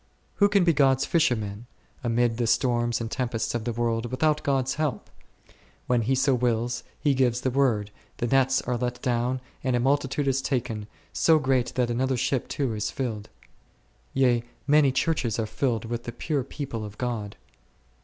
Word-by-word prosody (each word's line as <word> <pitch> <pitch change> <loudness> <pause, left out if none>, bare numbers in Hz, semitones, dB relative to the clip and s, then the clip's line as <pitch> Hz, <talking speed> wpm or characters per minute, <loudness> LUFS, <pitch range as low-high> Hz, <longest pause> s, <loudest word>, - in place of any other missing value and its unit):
Who 205 0 +5
can 200 -2 +4
be 170 -1 +4
Gods 135 -2 +3
fisherman, 115 -8 0 0.4
amid 120 -1 +1
the 120 -1 0
storms 120 -1 +1
and 115 -1 -4
tempests 120 -3 -2
of 120 -2 -3
the 120 - 0
world, 115 0 -1
without 150 +5 +1
God's 135 -2 0
help? 150 -4 -3 0.7
When 125 -1 +2
He 130 +4 +1
so 135 +1 +3
wills, 120 0 0 0.2
He 145 - +2
gives 125 -2 +1
the 130 - 0
word, 120 -6 +1 0.3
the - - -1
nets 130 +1 +2
are 125 -1 -1
let 125 0 -3
down 125 +1 0 0.2
and 130 -1 +1
a - - +2
multitude 140 +2 +1
is 135 0 +2
taken, 115 -6 -2 0.3
so 160 -1 +4
great 130 -4 0
that 125 -2 +1
another 130 +2 0
ship 130 +1 0
too 135 -5 -1
is 105 -1 -2
filled; 110 -5 -4 0.8
yea, 125 -3 +2 0.2
many 145 -1 +5
Churches 130 -6 0
are 110 - 0
filled 115 0 -1
with 120 +1 -4
the 120 - -4
pure 140 +3 -2
people 130 -4 -5
of 105 -1 -8
God. 115 -5 -3
125 Hz, 175 wpm, -26 LUFS, 115-135 Hz, 0.8 s, Who